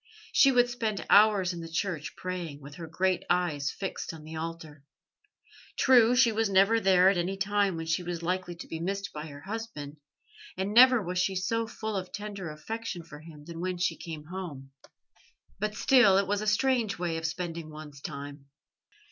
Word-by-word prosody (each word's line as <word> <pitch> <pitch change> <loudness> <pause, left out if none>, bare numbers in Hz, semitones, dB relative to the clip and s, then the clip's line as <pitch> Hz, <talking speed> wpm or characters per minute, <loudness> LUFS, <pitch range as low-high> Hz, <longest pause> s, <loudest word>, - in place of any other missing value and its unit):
She 275 - +6
would 245 -1 +4
spend 225 -4 -3
hours 200 -3 +5
in 170 - -6
the 165 - -8
church 165 -2 -3
praying, 175 -5 -5
with 145 0 -11
her 165 -2 -7
great 185 +3 0
eyes 155 -6 +1
fixed 190 -1 -5
on 155 - -12
the 160 +1 -9
altar. 160 -3 -7 0.9
True, 245 -2 +5
she 245 -2 +5
was 220 -1 0
never 200 +4 +4
there 190 -2 +5
at 195 - -1
any 185 +3 -2
time 200 -1 +1
when 165 0 -5
she 165 +2 0
was 175 -1 -5
likely 180 0 -2
to 170 - -10
be 160 - -5
missed 195 +3 -3
by 150 +1 -6
her 145 -1 -10
husband, 195 -9 -6 0.6
and 190 +2 -2
never 250 -1 +7
was 180 0 -2
she 190 +1 +1
so 225 +5 -1
full 220 -1 -5
of 185 -1 -4
tender 205 -4 -6
affection 190 +4 -6
for 150 -2 -12
him 155 -2 -13
as 170 - -7
when 180 +2 -3
she 180 - 0
came 160 -3 -8
home; 155 -7 -7 0.9
but 210 +1 -2
still, 210 -6 +5
it 200 - +2
was 205 +1 -1
a 215 - -3
strange 230 -1 +1
way 170 -1 -2
of 160 0 -2
spending 170 -2 -5
one's 150 -2 -11
time. 140 -1 -8
180 Hz, 190 wpm, -29 LUFS, 160-205 Hz, 0.9 s, never